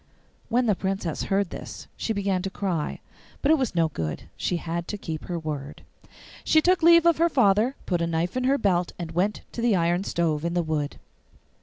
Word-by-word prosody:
When 245 +2 +2
the 215 - +3
Princess 190 -4 -2
heard 195 -2 0
this - - -8
she - - -3
began 200 -3 0
to 195 - -3
cry, 185 -6 -3 0.4
but 285 - +4
it 320 - +4
was 255 -8 -1
no 165 -2 +3
good; 80 - -4
she 180 - -1
had 170 0 -4
to 210 - -4
keep 160 -5 -6
her 175 - -3
word. 150 -3 -6 0.6
She 315 - +4
took 360 +3 +3
leave 335 0 +7
of 340 -2 +4
her 335 +1 +4
father, 240 -1 +3
put 175 -3 0
a 170 - +1
knife 165 +4 -1
in 255 0 0
her 275 +2 +3
belt, 180 -7 +1
and 170 -2 -5
went 185 +5 0
to 235 - -5
the 230 -3 +3
iron 175 +1 +1
stove 165 -5 0
in 170 +1 -1
the 175 - +2
wood. 155 -2 -2
185 Hz, 210 wpm, -25 LUFS, 165-230 Hz, 0.6 s, leave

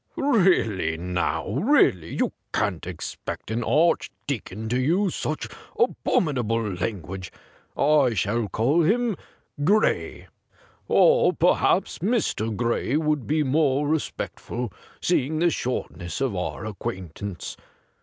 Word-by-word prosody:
' - - -39
Really, 175 - +2
now, 90 -2 -1
really, 130 - +3
you - - 0 0.2
can't - - -1
expect - - -6
an 115 +1 -1
Archdeacon 125 - 0
to 125 +2 +1
use 175 +8 +2
such 155 - -3 0.3
abominable 120 - +1
language. 95 -1 -4 0.5
I 140 -5 +4
shall 105 +4 0
call 130 +12 +2
him 225 +6 +2 0.5
Gray 210 +7 +1 0.3
— - - -31
or - - +5
perhaps - - +2
Mr. 185 - 0
Gray 120 +3 0
would 150 -4 0
be 155 +1 +2
more 145 0 +2
respectful, 125 - -3 0.3
seeing 155 -3 +1
the 170 +1 +3
shortness 95 - -3
of 135 -7 0
our 90 +3 -3
acquaintance. 95 -2 -5
125 Hz, 115 wpm, -25 LUFS, 105-160 Hz, 0.5 s, or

